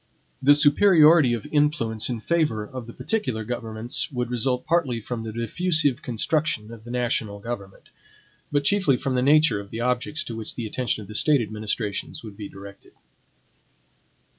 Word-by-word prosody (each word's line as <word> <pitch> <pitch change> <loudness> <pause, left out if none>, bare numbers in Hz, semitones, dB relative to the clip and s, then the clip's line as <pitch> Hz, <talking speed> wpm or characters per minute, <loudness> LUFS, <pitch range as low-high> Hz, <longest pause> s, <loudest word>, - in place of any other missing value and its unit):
The 145 +2 +6
superiority 155 -3 +6
of 115 - -7
influence 145 -8 +1
in 120 -3 -3
favor 150 -9 0
of 125 -1 -8
the 115 - -9
particular 130 - -2
governments 115 +1 -3
would 125 -2 -3
result 125 +1 0
partly 145 -8 +1
from 115 +1 -5
the 110 -1 -5
diffusive 145 - +1
construction 120 -2 -1
of 110 -1 -13
the - - -10
national 120 -4 -1
government, 100 -3 -7 0.6
but 145 -1 +1
chiefly 180 -6 +3
from 135 0 -2
the 125 - +1
nature 145 -4 +4
of 100 -1 -9
the 115 +2 -5
objects 125 +6 -1
to 115 - -7
which 110 -1 -7
the 120 - -4
attention 115 -1 -2
of - - -13
the 105 - -9
State 145 +6 +3
administrations 105 -1 -4
would 105 -3 -9
be 100 -1 -8
directed. 100 0 -13
120 Hz, 165 wpm, -24 LUFS, 110-145 Hz, 0.6 s, The